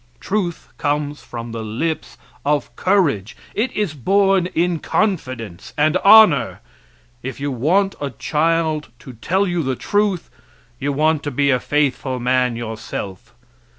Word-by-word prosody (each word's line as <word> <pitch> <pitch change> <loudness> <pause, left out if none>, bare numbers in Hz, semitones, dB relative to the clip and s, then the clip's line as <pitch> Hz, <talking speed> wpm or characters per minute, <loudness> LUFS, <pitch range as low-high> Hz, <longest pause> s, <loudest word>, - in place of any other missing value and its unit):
Truth 190 -4 -2
comes 145 0 -1
from 115 -1 -7
the 115 0 -5
lips 120 +10 -3 0.3
of 145 0 0
courage. 160 - +1 0.2
It 230 +5 0
is 205 -7 -1
born 195 - +2
in 170 0 +1
confidence 130 - -2
and 155 +2 +3
honor. 215 +3 +6 0.6
If 130 +2 -6
you 140 0 -2
want 180 - +2
a 145 - -1
child 155 +4 0
to 130 - -11
tell 185 - 0
you 175 -2 0
the 130 -3 -1
truth 205 - 0 0.5
you 140 +1 -1
want 155 +2 +2
to 145 - -3
be 140 +1 +2
a 130 - +2
faithful 135 -3 0
man 125 0 +1
yourself. 110 -1 -6
150 Hz, 140 wpm, -20 LUFS, 125-180 Hz, 0.6 s, honor